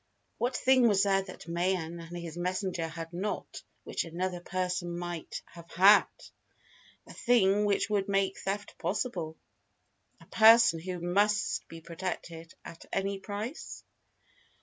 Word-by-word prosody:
What 245 +1 0
thing 260 -2 +4
was 200 -3 +3
there 195 -1 +3
that 185 -3 -11
Mayen 170 -1 -1
and 170 +1 -8
his 170 -2 -7
messenger 180 -1 -2
had 165 +1 -8
not, 195 +4 -4 0.2
which - - -2
another 175 +2 -3
person 180 -1 -3
might 175 -2 -6
have 170 0 -14
had? 195 +4 +6 1.0
A - - -12
thing 210 -4 +3
which 205 -1 +1
would 205 -2 -1
make 195 -1 0
theft 205 +2 -4
possible? 175 -7 -3 0.8
A - - -17
person 225 -5 +6
who 180 +1 -5
must 205 +4 +1
be 165 0 -10
protected 170 -1 -6
at 165 - -10
any 195 0 -1
price? 210 +8 -6
185 Hz, 135 wpm, -30 LUFS, 170-205 Hz, 1.0 s, had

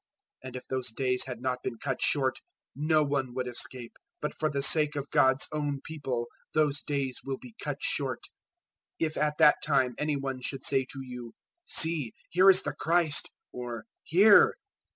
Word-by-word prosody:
024:022 - - -7
And 130 - -9
if 125 - -8
those 130 -2 -2
days 125 0 0
had 125 -2 -7
not 130 -1 -1
been 115 - -4
cut 130 +2 -3
short, 135 -3 +1 0.4
no 155 +1 +2
one 135 -3 -2
would 130 -1 -2
escape; 120 0 -6 0.3
but 150 - -3
for 155 - -1
the 140 -1 -1
sake 150 -1 +4
of 140 0 -5
God's 130 +1 +3
own 145 -2 -2
People 135 -7 -3 0.3
those 150 -2 +2
days 135 -3 -2
will 135 -1 -3
be 245 - -13
cut - - -3
short. - - -2 0.8
024:023 - - +2
"If 155 - -4
at 150 0 0
that 150 - +6
time 135 -4 +2
any 150 0 0
one 135 -2 -4
should 135 +1 -4
say 135 -2 +2
to 135 - -7
you, 125 -2 -9 0.4
`See, 160 -8 +3 0.2
here 185 +3 +6
is 190 -1 +6
the - - -3
Christ!' 165 -3 +1 0.2
or 120 -1 -6 0.3
`Here!' 200 +5 +7
140 Hz, 185 wpm, -29 LUFS, 130-150 Hz, 0.8 s, `Here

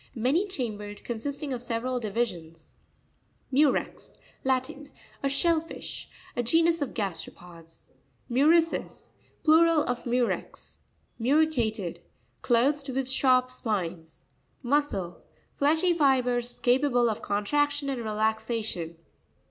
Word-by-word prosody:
Many 270 - +1
chambered; 210 - -5
consisting 275 +4 -4
of 245 - -4
several 245 +1 -2
divisions. 185 -8 -4 0.8
Mu'rex. 280 +1 +1
— - - -32
Latin. 265 +3 -1 0.3
A 275 - 0
shell 325 +4 +3
fish, 330 - -7 0.3
A - - +1
genus 330 +6 +3
of 285 - -3
gasteropods. 170 -4 -6 0.4
Mvu'ricres.—Plural 320 +2 +2
of 245 -2 -3
Murex. 245 0 -2 0.4
Mo'ricarep. 235 - +1 0.2
— - - -41
Clothed 275 +4 +2
with 265 0 -1
sharp 255 -1 +3
spines. 175 -9 -3 0.4
Mo'scrr.—Fleshy 290 - 0
fibres 250 -5 +2
capable 245 -1 +3
of 220 -2 -2
contraction 290 +8 0
and 265 -3 -2
relaxation. 220 -5 -1
250 Hz, 100 wpm, -27 LUFS, 220-290 Hz, 0.8 s, shell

